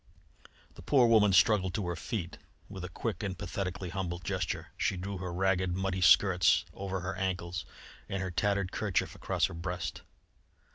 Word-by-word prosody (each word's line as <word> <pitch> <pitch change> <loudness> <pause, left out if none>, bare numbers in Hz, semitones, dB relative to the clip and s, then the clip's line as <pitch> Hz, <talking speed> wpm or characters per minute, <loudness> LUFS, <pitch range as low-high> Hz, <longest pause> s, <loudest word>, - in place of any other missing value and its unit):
The - - -12
poor 130 -4 +4
woman 110 -3 +5
struggled 95 0 +4
to 105 - -1
her 85 0 -2
feet. 85 +1 -4 0.3
With 95 -2 -8
a 90 - -5
quick 110 +5 -3
and 95 -3 -3
pathetically 90 0 -4
humble 90 -2 -3
gesture 90 0 -3
she 95 - 0
drew 95 +1 -5
her 90 -1 -4
ragged, 95 0 +1
muddy 95 0 -1
skirts 90 +1 +5
over 95 -1 -4
her 90 +2 -3
ankles 90 -2 -2 0.4
and 95 - -2
her 95 -1 -3
tattered 100 +2 0
kerchief 105 -4 -1
across - - 0
her - - -4
breast. 85 -1 -4
95 Hz, 165 wpm, -31 LUFS, 90-100 Hz, 0.4 s, woman